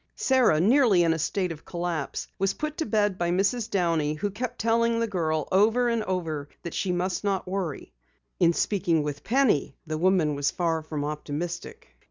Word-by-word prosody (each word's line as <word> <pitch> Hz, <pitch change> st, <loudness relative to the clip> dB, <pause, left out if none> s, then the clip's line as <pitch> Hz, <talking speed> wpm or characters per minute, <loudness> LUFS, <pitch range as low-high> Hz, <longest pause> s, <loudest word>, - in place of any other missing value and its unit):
Sara, 255 Hz, -12 st, +3 dB
nearly 215 Hz, -, +4 dB
in 165 Hz, -1 st, +3 dB
a 165 Hz, -, -3 dB
state 180 Hz, +3 st, -1 dB
of 160 Hz, -2 st, -8 dB
collapse, 170 Hz, -4 st, -3 dB
was 195 Hz, 0 st, +1 dB
put 305 Hz, 0 st, -4 dB
to 320 Hz, -, -2 dB
bed 205 Hz, -3 st, +1 dB
by 175 Hz, 0 st, 0 dB
Mrs. 200 Hz, +6 st, +1 dB
Downey, 165 Hz, -5 st, +1 dB
who 205 Hz, +6 st, -2 dB
kept 245 Hz, +4 st, -4 dB
telling 230 Hz, +1 st, +2 dB
the 230 Hz, -, +1 dB
girl 160 Hz, -7 st, -1 dB
over 225 Hz, +6 st, +3 dB
and 230 Hz, -1 st, 0 dB
over 160 Hz, -6 st, -3 dB
that 170 Hz, -, -6 dB
she 190 Hz, -, -1 dB
must 180 Hz, +2 st, -1 dB
not 195 Hz, -2 st, -1 dB
worry. 180 Hz, -6 st, -4 dB, 0.5 s
In 170 Hz, -2 st, +5 dB
speaking 170 Hz, -3 st, +1 dB
with 145 Hz, -1 st, -5 dB
Penny, 235 Hz, -, +2 dB
the 155 Hz, -1 st, -3 dB
woman 180 Hz, -4 st, +3 dB
was 145 Hz, 0 st, 0 dB
far 165 Hz, -2 st, -1 dB
from 155 Hz, -2 st, -4 dB
optimistic. 165 Hz, -, -5 dB
180 Hz, 185 wpm, -26 LUFS, 160-215 Hz, 0.5 s, In